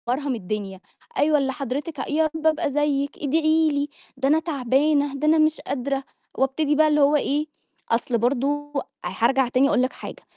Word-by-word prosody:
مرهم 265 +2 -1
الدنيا، 200 -2 -5 0.4
أيوه 300 -2 +3
اللي 270 -2 0
حضرتِك 275 +3 -4
يا 310 +2 +2
رَب 320 0 0
أبقى 315 -1 +1
زيِك، 285 -1 0
إدعي 315 +2 +2
لي، 285 0 -1 0.3
ده 265 - 0
أنا 305 +3 +4
تَعبانة، 285 -1 +1
ده 295 +2 -1
أنا 315 +1 +5
مش 310 0 +2
قادرة، 275 0 -3 0.3
وأبتدي 285 +3 +1
بقى 310 +1 +4
اللي 300 -1 +3
هو 285 +1 +4
إيه، 295 +1 0 0.5
أصل 235 +1 +1
برضه 280 +5 -1 0.3
هارجع 255 +3 +1
تاني 255 +2 +3
أقول - - +2
لِك 255 - 0
حاجة، - - -9
285 Hz, 175 wpm, -23 LUFS, 260-305 Hz, 0.5 s, أنا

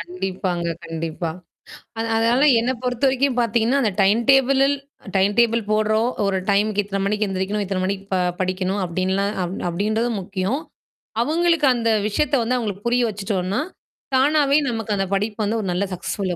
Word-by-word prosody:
கண்டிப்பாங்க, 180 0 -3 0.2
கண்டிப்பா. 165 0 -4 0.7
அது 230 - -1
அதனால 235 +5 +3 0.2
என்ன 245 +3 0
பொறுத்தவரைக்கும் 260 +1 +1
பார்த்தீங்கன்னா, 235 +3 +2
அந்த 215 - +1
டைம் 210 +5 +3
டேபிள்ல 270 0 +4 0.5
டைம் 195 +2 +3
டேபிள் 230 0 +3
போடுறோம், 215 +2 +2 0.2
ஒரு 195 -1 +1
டைமுக்கு 205 +1 +2
இத்தன 195 0 -4
மணிக்கு 210 +1 0
எந்திரிக்கணும், 195 +2 -2
இத்தன 185 -1 -2
மணிக்கு 195 0 -3
ப - - +3 0.2
படிக்கணும் 185 +1 -1
அப்படின்லாம் 190 +3 -1
அப் 180 +2 -4
அப்படின்றதும் 215 +5 -1
முக்கியம். 195 +7 -2 0.6
அங்களுக்கு 330 0 +2
அந்த 230 -1 0 0.2
விஷயத்த 280 +7 0
வந்து 250 +2 0
அங்களுக்கு 205 -2 -4
புரிய 245 +1 +2
வச்சுட்டோம்னா. 195 0 -2 0.6
தானாவே 285 +1 +4
நமக்கு 225 -3 -2
அந்த 195 - 0
படிப்பு 210 +2 -2
வந்து 225 +2 0
ஒரு 195 - -4
நல்ல 180 - 0
சக்சஸ்ஃபுல்லா 185 0 -3
210 Hz, 150 wpm, -22 LUFS, 190-240 Hz, 0.7 s, டேபிள்ல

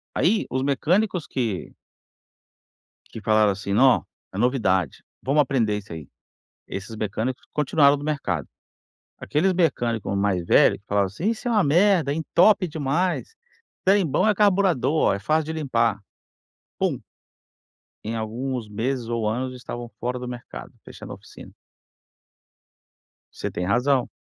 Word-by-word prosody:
Aí 205 +6 +2
os 130 +1 -1
mecânicos 175 +5 +1
que 115 -8 -3 1.4
que 115 - -8
falaram, 110 -1 +3
assim, 100 0 -4
não, 130 +4 +4 0.3
é - - -6
novidade, 105 - +1 0.2
vamos 145 +3 +3
aprender 115 -6 +1
isso 100 -4 -9
aí. 80 -3 -8 0.6
Esses 100 +3 -6
mecânicos 110 +4 -3
continuaram 145 -1 +4
no 145 - -8
mercado. 150 -2 -2 0.7
Aqueles 175 +6 +1
mecânico 120 - 0
mais 100 -3 0
velho - - +5
que 100 - -31
falaram, 100 -1 +1
assim: 165 - -2
"Isso 230 +2 -3
é - - 0
uma 210 -4 +3
merda, 170 -1 +3
entope 180 +5 +3
demais, 160 - -1 0.5
trem 195 -1 +4
bom 155 +8 +2
é 210 - +3
carburador, 195 - +2 0.2
olha, 100 - +1
é - - -8
fácil 155 +6 +1
de 160 - -4
limpar". 120 -8 0 0.8
Pum! - - 0 1.1
Em 110 +2 -3
alguns 120 +2 -4
meses 120 +3 -2
ou 115 -2 -1
anos 125 +3 -3
estavam 120 -1 -7
fora 125 +1 -3
do 125 - -6
mercado, 120 -1 -8
fechando - - -11
a - - -7
oficina. - - -14 1.8
Você - - -4
tem 90 - -3
razão. 125 +6 +2
130 Hz, 140 wpm, -24 LUFS, 110-160 Hz, 1.8 s, velho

